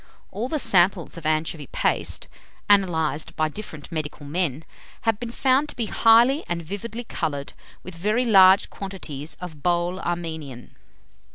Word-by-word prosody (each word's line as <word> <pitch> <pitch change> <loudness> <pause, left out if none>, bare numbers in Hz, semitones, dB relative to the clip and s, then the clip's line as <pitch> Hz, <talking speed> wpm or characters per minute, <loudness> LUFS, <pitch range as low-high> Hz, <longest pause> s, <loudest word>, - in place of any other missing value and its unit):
All 220 +6 -3
the 310 - 0
samples 180 - +2
of 165 -2 -5
anchovy 155 -2 -1
paste, - - -1 0.4
analyzed 165 -6 +2
by 155 0 +1
different 155 -4 -9
medical 155 -2 -5
men, 155 -1 -1 0.4
have 225 -2 0
been 240 - -5
found 265 +4 +2
to - - -9
be 235 - -1
highly 235 +7 +4
and 170 -1 -2
vividly 215 +7 -6
coloured 150 -10 -4 0.3
with 185 - -8
very 210 +9 0
large 190 -3 +6
quantities 165 -7 -7
of 160 -5 -9
bole 175 +2 0
Armenian." 160 -8 -5
175 Hz, 145 wpm, -24 LUFS, 155-215 Hz, 0.4 s, large